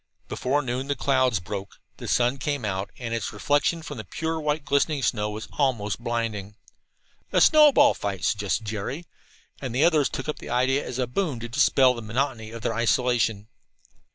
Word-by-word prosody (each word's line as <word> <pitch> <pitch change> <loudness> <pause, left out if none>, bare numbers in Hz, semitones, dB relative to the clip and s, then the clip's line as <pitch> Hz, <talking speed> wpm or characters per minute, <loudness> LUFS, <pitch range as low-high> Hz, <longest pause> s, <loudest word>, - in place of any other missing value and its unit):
Before 145 +3 -1
noon 130 +1 -3
the 145 - 0
clouds 130 -7 +2
broke, 100 +1 -7 0.2
the - - -8
sun 125 +2 +2
came 140 -3 -2
out, 95 -1 -2
and 115 -2 -5
its 115 - -2
reflection 145 +3 +1
from 145 -3 -7
the - - -5
pure 160 +5 -3
white 150 0 -1
glistening 140 0 +1
snow 105 -3 0
was 105 +1 -6
almost 120 -6 0
blinding. 110 -4 -3 0.8
"A - - +3
snowball 295 -2 +6
fight," 95 -5 -4
suggested 105 +4 0
Jerry, 110 +10 -4 0.6
and 130 -3 -4
the 135 - +3
others 155 -4 +4
took - - -5
up 150 - -3
the - - -9
idea 130 +3 +1
as 125 - -5
a 130 - +1
boon 140 0 -2
to 120 - -4
dispel 130 +2 +4
the 120 - -7
monotony 115 0 -2
of 115 0 -9
their - - 0
isolation. 115 -2 +1
125 Hz, 180 wpm, -25 LUFS, 110-145 Hz, 0.8 s, snowball